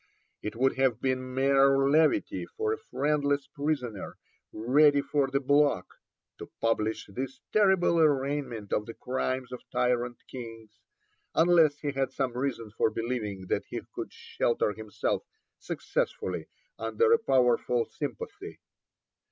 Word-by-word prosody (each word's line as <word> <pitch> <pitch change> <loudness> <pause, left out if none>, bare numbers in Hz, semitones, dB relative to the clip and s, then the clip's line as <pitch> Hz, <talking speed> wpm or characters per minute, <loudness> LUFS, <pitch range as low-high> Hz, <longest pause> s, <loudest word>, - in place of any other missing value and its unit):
It 105 - -5
would 130 +3 +1
have 130 -4 +2
been 130 -1 -2
mere 135 0 +4
levity 160 - +2
for 440 0 -2
a - - -3
friendless 145 - 0
prisoner, 135 -9 -3 0.3
ready 145 +6 +4
for 140 -1 +1
the 135 +1 0
block, 145 +1 +3 0.5
to - - -8
publish 110 -1 0
this 130 +6 -5
terrible 190 -5 +4
arraignment 140 -7 0
of 105 - 0
the 115 - -7
crimes 130 0 -2
of 125 - -6
tyrant 125 -1 0
kings, 115 -3 -10 0.6
unless 165 -3 +5
he 145 -1 -3
had 135 -1 -1
some 130 -3 -2
reason 125 -4 -3
for 110 - +1
believing 110 -5 -3
that - - -1
he - - -4
could - - -5
shelter 115 -2 -1
himself 110 -1 -2 0.4
successfully - - -3 0.3
under 460 0 +2
a 460 - +5
powerful 125 - +2
sympathy. - - -6
135 Hz, 130 wpm, -29 LUFS, 120-145 Hz, 0.6 s, unless